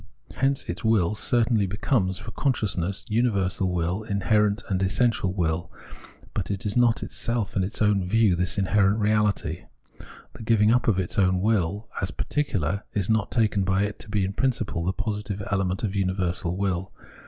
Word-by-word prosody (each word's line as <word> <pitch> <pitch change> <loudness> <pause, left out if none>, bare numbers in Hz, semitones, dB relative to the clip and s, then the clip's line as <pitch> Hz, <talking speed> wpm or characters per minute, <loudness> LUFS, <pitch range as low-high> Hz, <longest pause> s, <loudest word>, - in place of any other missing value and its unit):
Hence 135 0 +1
its - - -5
will 105 -5 +2
certainly 110 -1 +2
becomes, 95 -1 0
for 115 +1 -8
consciousness, 100 - -1
universal 100 -5 +1
will, 90 +3 -1
inherent 105 0 +1
and 95 -2 -1
essential 100 0 +1
will, 85 -2 -1 0.6
but - - -3
is 100 +1 -2
not 120 -2 +3
itself 115 -4 -3
in 95 - +2
its 100 +3 -1
own 105 -2 +3
view 105 0 +3
this 90 +2 -1
inherent 100 +1 +3
reality. 105 -6 0 0.7
The - - -11
giving 110 -1 +3
up 125 - +1
of 110 -5 +3
its 95 +5 -1
own 95 -1 +3
will 105 0 0
as 95 - -1
particular 95 - -2
is 100 +1 +1
not 110 -2 +1
taken 105 -4 +1
by 95 +1 +1
it 105 0 -3
to - - -9
be 105 -2 +1
in 95 - -3
principle 115 -7 -1
the 90 - +1
positive 105 -1 -4
element 95 -1 0
of 105 -2 -2
universal 90 -2 -1
will. 95 -2 -1
100 Hz, 165 wpm, -25 LUFS, 95-110 Hz, 0.7 s, not